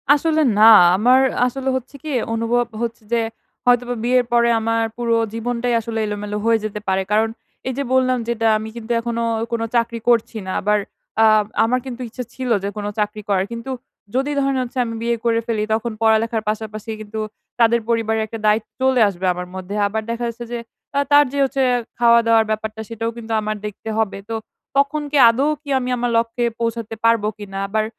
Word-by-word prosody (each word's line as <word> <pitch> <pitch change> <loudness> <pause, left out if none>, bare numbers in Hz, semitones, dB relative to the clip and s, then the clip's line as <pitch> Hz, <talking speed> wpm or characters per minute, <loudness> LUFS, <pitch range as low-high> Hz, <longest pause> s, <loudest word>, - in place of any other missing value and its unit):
আসলে 315 +1 +1 0.2
না 220 +1 +9 0.3
আমার 250 +5 +5 0.3
আসলে 265 +1 -3
হচ্ছে 260 +2 -10
কি - - -8
এ - - +1
অনুভব 230 +2 +1 0.2
হচ্ছে 230 0 -4
যে, - - +4 0.5
হয়তোবা 245 0 +3
বিয়ের 250 +1 +3
পরে 235 0 +4
আমার 230 0 0
পুরো 235 -1 +1 0.2
জীবনটাই 240 +1 -1
আসলে 225 0 -4
এলোমেলো 210 0 -4
হয়ে 230 -1 +4
যেতে 210 -1 -4
পারে। 190 0 +1
কারণ 220 +1 +3 0.4
এই 260 - -1
যে 280 - 0
বললাম 255 -1 +3
যেটা, 230 -1 0
আমি 215 +1 -6
কিন্তু 235 0 -6
এখনোও 230 0 -2 0.2
কোনো 230 -1 -1
চাকরি 235 0 +1
করছি 230 -1 +2
না 190 - -4
আবার, 210 +1 +2 0.4
আ - - +7 0.4
আমার 245 +3 +2
কিন্তু 255 -1 -6
ইচ্ছা 250 +3 -6
ছিল, 255 -1 -4
যে 200 - -1
কোন 205 - -4
চাকরি 210 +1 -1
করার। 190 -1 +2
কিন্তু 235 +3 -5 0.4
যদি 270 +3 +1
ধরেন 275 -1 +1
হচ্ছে 250 +1 -9
আমি 230 - -4
বিয়ে 235 0 +1
করে 230 -1 +3
ফেলি, 220 -2 0
তখন 225 +2 -1
পড়া-লেখার 225 0 +2
পাশাপাশি 215 0 -4
কিন্তু, 215 +1 -6 0.4
তাদের 235 0 +4
পরিবারের 220 -1 +1
একটা 225 +1 -7
দায়ি 210 +1 +4 0.2
চলে 260 -2 +3
আসবে 190 -1 -5
আমার 180 0 -6
মধ্যে। 190 +2 -6
আবার 220 +2 -2
দেখা 235 +1 -3
যাচ্ছে 235 +1 -6
যে, 240 - -3 0.4
আ - - +4
তার 290 0 +7
যে 285 - -4
হচ্ছে, 270 0 -1 0.4
খাওয়া-দাওয়ার 230 -1 +5
ব্যাপারটা 220 0 -3
সেটাও 230 0 -3
কিন্তু 230 -1 -8
আমার 215 0 -2
দেখতে 210 +1 -6
হবে 220 -3 0
তো, 225 - -2 0.4
তখন 280 +2 +2
কি 295 - +2
আদৌ 260 +5 +1 0.2
কি 290 - -10
আমি 250 0 -3
আমার 245 0 -1
লক্ষ্যে 230 +1 0
পৌঁছাতে 230 -1 -3
পারবো 230 -2 +3
কিনা? 200 -2 -8
আবার, 215 +1 0
230 Hz, 195 wpm, -20 LUFS, 220-245 Hz, 0.5 s, না